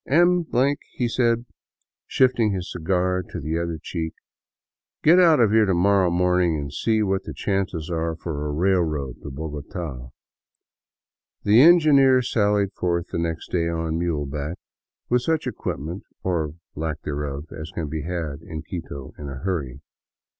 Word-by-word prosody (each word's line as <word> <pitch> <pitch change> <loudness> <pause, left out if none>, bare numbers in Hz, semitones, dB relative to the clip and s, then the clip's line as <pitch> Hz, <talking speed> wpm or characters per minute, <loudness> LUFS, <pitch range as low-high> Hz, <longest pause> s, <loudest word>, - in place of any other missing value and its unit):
" - - -29
M 175 +3 +4 0.2
," 140 +1 -3
he 120 - +1
said, 115 0 +1 0.6
shifting 125 -4 +3
his 95 -2 -4
cigar 90 +2 0
to 85 - -5
the 80 +2 -2
other 85 -1 -2
cheek, 80 -1 -4 0.4
" - - -66
get 170 +4 +7
out 165 -5 +6
of 110 -4 +4
here 110 -1 +4
to 95 - +2
morrow 95 +1 +4
morning 90 -1 +2
and 70 -1 -5
see 110 +6 +1
what 95 -1 0
the - - -7
chances 95 -5 -2
are 80 0 -1
for 75 -2 -4
a - - -2
railroad 80 -6 0
to - - -7
Bogota.'' 75 -2 -6 1.3
The 105 +4 +6
engineer 140 -6 +6
sallied 105 -3 +1
forth 85 -1 -2
next 85 -1 -3
day 85 -2 +1
on 80 -1 -2
muleback, 75 -1 -2 0.5
with 125 0 +2
such 160 +4 0
equip - - -3
ment 85 +7 -6 0.2
or 80 -5 -1 0.2
lack 80 0 -4
thereof 75 +1 -4
as 80 0 -7
can 80 -2 -4
be 80 +1 -3
had 80 -3 -4
in 80 -3 -7
Quito 75 -5 -7
in 75 -1 -6
a 70 - -6
hurry. 70 -5 -3
85 Hz, 160 wpm, -24 LUFS, 75-105 Hz, 1.3 s, get